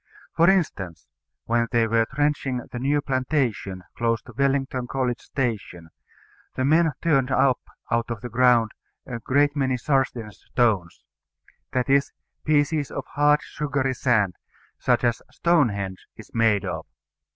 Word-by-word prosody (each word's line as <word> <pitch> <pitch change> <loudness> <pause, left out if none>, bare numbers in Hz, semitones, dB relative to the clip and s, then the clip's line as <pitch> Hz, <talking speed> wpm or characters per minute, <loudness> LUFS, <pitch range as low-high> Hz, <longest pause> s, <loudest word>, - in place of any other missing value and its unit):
For 170 +2 +5
instance: 95 - 0 0.4
When 115 0 +1
they 115 -2 +3
were 115 0 +2
trenching 140 -3 -1
the 120 - -5
new 145 +3 +1
plantation 125 -8 -1
close 115 -1 +1
to 120 - -13
Wellington 135 -1 0
College 125 -2 -1
station, 105 - -4 0.6
the 130 - 0
men 160 +2 +4
turned 140 -6 +2
up 135 -1 +3 0.3
out 115 0 +1
of 115 -3 -4
the 125 - -5
ground 120 -2 +4 0.3
a 120 -2 -5
great 145 +4 +2
many 130 -3 +1
Sarsden 125 -5 0
stones; 105 -6 -1 0.7
that 125 -1 0
is, 140 0 +2 0.3
pieces 145 -1 +1
of - - -5
hard 150 +1 +3
sugary 140 -3 -2
sand, 105 -9 +1 0.4
such 125 -1 +2
as 120 -1 +1
Stonehenge 105 - 0
is - - -13
made 110 -3 +2
of. 80 -3 -4
125 Hz, 140 wpm, -24 LUFS, 115-140 Hz, 0.7 s, For